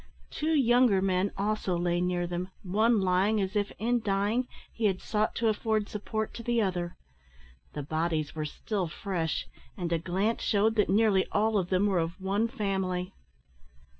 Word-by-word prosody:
Two 315 +1 0
younger 245 -6 +4
men 190 +1 +1
also 200 -3 0
lay 175 0 0
near 180 -1 0
them, 175 +1 -4
one 215 +4 +2
lying 190 +4 +2
as 195 +1 -2
if, 205 -1 0
in 240 +3 +1
dying, 210 +4 0 0.3
he 225 - -2
had 190 -3 +2
sought 215 0 -1
to 230 - +1
afford 215 -1 0
support 215 +1 -3
to - - -7
the 235 0 0
other. 180 -4 -1 0.8
The 145 - -4
bodies 155 0 -1
were 155 -1 -3
still 190 +4 -3
fresh, 165 -1 -2 0.3
and 170 -1 -2
a 165 - +1
glance 190 +7 -1
shewed 215 +2 +2
that 210 -2 +2
nearly 200 -1 +3
all 215 +1 +2
of 180 -2 -3
them 185 +2 +2
were 195 -3 +2
of 165 +3 -3
one 200 +4 0
family. 190 -5 -2
195 Hz, 170 wpm, -29 LUFS, 180-220 Hz, 0.8 s, younger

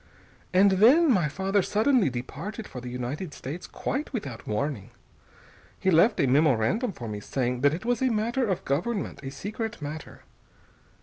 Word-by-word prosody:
And 195 +2 +5
then 260 - +6
my 180 -9 +3
father 195 +5 +1
suddenly 220 - +2
departed 160 - -6
for 125 - -8
the 125 - -6
United 125 +7 -5
States, 150 +7 -7
quite 280 +3 -3
without 140 - -6
warning. 110 -1 -2 0.9
He 190 - +2
left 175 +8 +4
a - - +4
memorandum 145 - +2
for 120 -10 -8
me, 105 -1 -4
saying 125 +3 -2
that 145 +1 +5
it 185 - -8
was 245 +2 0
a 260 - +3
matter 235 +3 0
of 185 - -2
government, 190 - -2
a 135 - -5
secret 215 - -5
matter. 150 +1 -7
175 Hz, 165 wpm, -27 LUFS, 135-220 Hz, 0.9 s, then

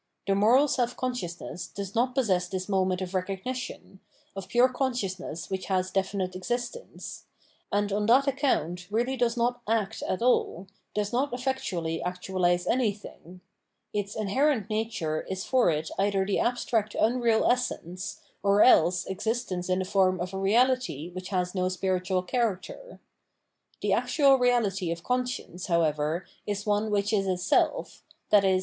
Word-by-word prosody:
The 195 - +2
moral 230 +9 +5
self 245 -3 0
consciousness 185 -8 -4
does 200 -1 -6
not 250 +2 +1
possess 190 -9 +2
this 185 0 -4
moment 190 -2 +1
of 180 - -6
recog 190 0 -3
nition, 250 -6 -6 0.4
of 195 -1 -6
pure 240 +2 +5
consciousness 200 - -3
which 190 -1 -3
has 185 -1 0
definite 190 -1 -1
exist 240 - -2
ence; 485 - -10 0.5
and 205 0 0
on 210 +1 0
that 260 +4 +5
accoimt 180 - 0
really 240 +5 0
does 240 -1 0
not 245 +1 0
" - - -38
act 200 -2 -6
" - - -5
at 185 - -1
aU, 220 -7 +2 0.3
does 210 +1 -1
not 270 +4 +1
efiectuaUy 200 -11 -2
actualise 180 0 0
anything. 205 -6 -2 0.5
Its 205 -1 -2
inher 220 +8 +2
ent 220 -5 -3
nature 215 -8 -1
is 190 0 -3
for 255 -7 +3
it 155 0 -1
either 195 -1 +2
the 200 - 0
abstract 225 -3 0
unreal 230 -1 +3
essence, 185 -8 -1 0.2
or 200 +1 +5
else 175 -6 +5
existence 190 -2 -2
in 185 - +2
the 185 - -1
form 185 -1 +2
of 180 +2 -4
a - - -3
reality 220 - +1
which 185 +1 -7
has 180 -2 -1
no 185 -1 0
spiritual 185 0 -1
character. 235 - -3 0.8
The - - +2
actual 275 -3 +4
reality 215 -8 +2
of 170 0 -5
conscience, 250 -8 -2
however, 160 -1 +1 0.2
is 205 -1 -2
one 210 +1 +1
which 205 +1 0
is 195 -2 +2
a 185 -1 +1
self, 180 - 0 0.3
i.e. 195 -2 +5
200 Hz, 160 wpm, -27 LUFS, 185-240 Hz, 0.8 s, moral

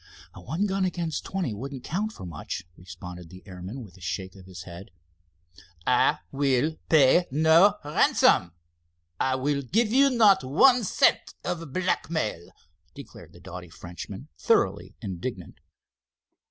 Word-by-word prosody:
"One 155 - -3
gun 195 -1 -1
against 175 -4 -2
twenty 185 - -3
wouldn't 130 +4 -7
count 205 +9 -2
for 155 - -10
much," 85 +2 -6
responded 90 -1 -10
the 95 +1 -13
airman, 95 +6 -8
with 95 -4 -15
a - - -18
shake 90 +3 -5
of 95 -1 -14
his 90 -1 -9
head. 85 +2 -11 1.0
"I - - +3
will 140 +3 +1
pay 160 +3 +5
no 160 +8 +5
ransom, 145 - +3 0.7
I 130 0 +1
will 140 +2 -1
give 215 - 0
you 275 +2 +5
not 215 -6 +4
one 245 - +4
cent - - +2
of 165 -4 -4
blackmail," 160 - -2 0.5
declared - - -12
the 85 - -16
doughty 90 -1 -9
Frenchman, 85 +2 -9
thoroughly - - +1
indignant. 95 0 -6
130 Hz, 135 wpm, -26 LUFS, -, 1.0 s, pay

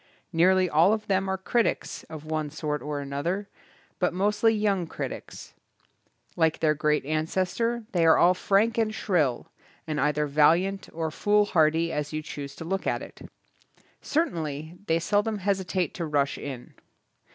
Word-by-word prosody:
Nearly 185 +2 +4
all 165 +5 +4
of 215 -1 -2
them 190 0 0
are 190 - 0
critics 230 +5 -1
of 155 -1 -8
one 155 -1 -2
sort 150 -1 -3
or 145 -1 -4
another, 165 +9 -3 0.5
but 180 -1 +1
mostly 210 +4 +2
young 205 -5 0
critics. - - -7 0.8
Like 160 -2 +2
their 155 -1 +3
great 150 -1 0
an 155 +1 -1
cestor 230 +6 -1
they 175 -3 +2
are 160 - +6
all 180 +1 +5
frank 205 +5 +2
and 220 -1 +1
shrill, 155 - 0 0.3
and 155 -2 -2
either 150 0 +1
valiant 170 +7 +2
or 160 -1 -3
foolhardy 170 -5 +2
as 150 0 -3
you 155 0 -3
choose 140 -2 -7
to 165 - -8
look 190 +3 -2
at - - -1
it. - - -12 0.8
Certainly 160 - -2
they 165 - +3
seldom 205 +5 0
hesitate 190 -2 -1
to 175 -6 -4
rush 145 -2 +1
in. 130 -4 -8
170 Hz, 155 wpm, -26 LUFS, 150-195 Hz, 0.8 s, are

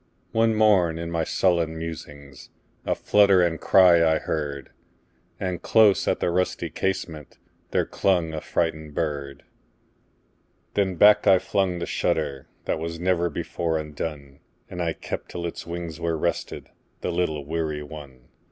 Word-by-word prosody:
One 115 0 +2
morn, 95 -7 +3
in 85 0 -5
my 85 -1 0
sullen 85 -2 +1
musings,A 70 -6 -7
flutter 100 -3 +4
and 80 -2 -1
cry 90 -3 +6
I 80 -1 +3
heard; 70 -4 -4 0.7
And 90 -2 -3
close 110 -3 +4
at - - +1
the 85 - 0
rusty 90 +1 -1
casementThere 85 -6 -4
clung 85 -4 +1
a 80 - -4
frightened 80 -3 -2
bird. 70 -4 -3 1.3
Then 95 -2 0
back 105 +4 +6
I 95 - +7
flung 95 -1 0
the 85 - -3
shutterThat 70 0 -2
was 85 0 -5
never 85 -1 +1
before 80 -1 -2
undone, 75 -2 -6 0.3
And 90 -1 -4
I 85 -1 0
kept - - -6
till 85 - -5
its 85 0 -6
wings 85 -1 -6
were 85 -1 0
restedThe 85 +2 -3 0.5
little 80 -5 -1
weary 75 -1 -3
one. 75 -4 -11
85 Hz, 135 wpm, -24 LUFS, 75-90 Hz, 1.3 s, I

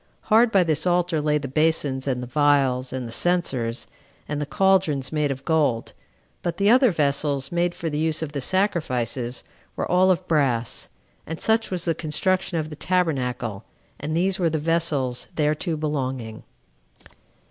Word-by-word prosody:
Hard 230 +1 +6
by 195 -4 +5
this 160 0 0
altar 175 -3 +1
lay 150 0 +2
the 140 -2 -4
basins, 145 -2 +1
and 125 -2 -1
the - - -6
vials, 135 -2 +2
and 130 -2 -4
the - - -8
censers, 130 -7 0 0.4
and 150 0 -3
the 145 - -3
caldrons, 185 -9 +2
made 150 -2 0
of 135 0 -5
gold; 145 -8 +1 0.5
but 175 - -3
the 200 +2 +4
other 255 +1 +6
vessels, 140 -3 0
made 175 0 0
for 170 -2 -4
the 150 -1 -2
use 160 0 0
of 150 - -5
the 140 -2 -4
sacrifices, 130 - -1 0.3
were - - -2
all 185 +1 +3
of 185 - +1
brass. 130 -7 0 0.4
And 165 +1 -5
such 225 0 +1
was 180 -2 -3
the 165 - +2
construction 170 +3 0
of 155 -1 -3
the - - -6
tabernacle; 125 - -1 0.4
and 155 +3 -2
these 190 +2 +1
were 170 -2 +2
the 160 - -1
vessels 150 -6 0
thereto 155 +2 0
belonging. 130 -7 -3
150 Hz, 170 wpm, -24 LUFS, 135-175 Hz, 0.5 s, Hard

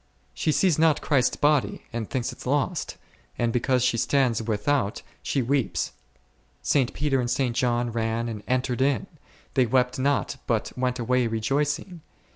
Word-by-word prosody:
She 155 - 0
sees 155 +2 +2
not 160 -2 +4
Christ's 135 -5 +2
body, 145 -2 +1
and 115 -2 -3
thinks 125 -2 -2
it - - -10
lost, 145 +6 -1 0.4
and 120 -1 0
because 125 0 +2
she 125 -2 +2
stands 125 -2 +2
without 110 +1 0 0.2
she 135 - 0
weeps. 115 -9 0 0.7
St. 130 -4 +2
Peter 140 -2 +1
and 120 -1 -1
St. 125 -2 0
John 120 -1 +1
ran 115 +1 -1
and 110 -3 -5
entered 130 0 0
in, 135 -4 +2 0.5
they 130 -2 +3
wept 125 +2 +1
not 140 +1 0
but 115 -3 0
went 125 0 -1
away 125 0 +1
rejoicing. 145 - -1
125 Hz, 155 wpm, -25 LUFS, 115-140 Hz, 0.7 s, not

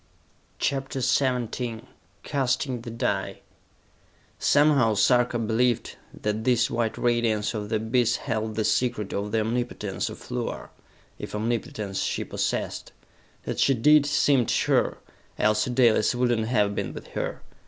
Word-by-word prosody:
CHAPTER 135 -1 -2
XVII 125 -3 0 0.4
Casting 130 -2 -1
the 120 - -8
Die 115 0 -2 1.0
Somehow 145 -7 +4
Sarka 120 +3 +3
believed 115 +1 0 0.2
that 105 +1 -3
this 120 -1 +2
white 115 -1 -1
radiance 115 -3 +1
of 105 -2 -4
the 110 - 0
abyss 115 +2 +1
held 110 -1 -3
the 110 0 0
secret 110 -5 0
of 100 +1 -3
the 110 - +1
omnipotence 110 -3 -2
of - - -11
Luar, - - -4 0.5
if - - -6
omnipotence 105 -3 -2
she - - -1
possessed. - - -3 0.5
That - - -4
she 135 - +4
did 150 +5 +5
seemed 140 -4 +3
sure, - - +1 0.4
else 105 0 +2
Dalis 120 -2 +3
would 120 -1 +2
not 110 -1 -2
have 105 -4 +2
been - - -3
with - - -10
her. - - -4
115 Hz, 135 wpm, -25 LUFS, 110-125 Hz, 1.0 s, did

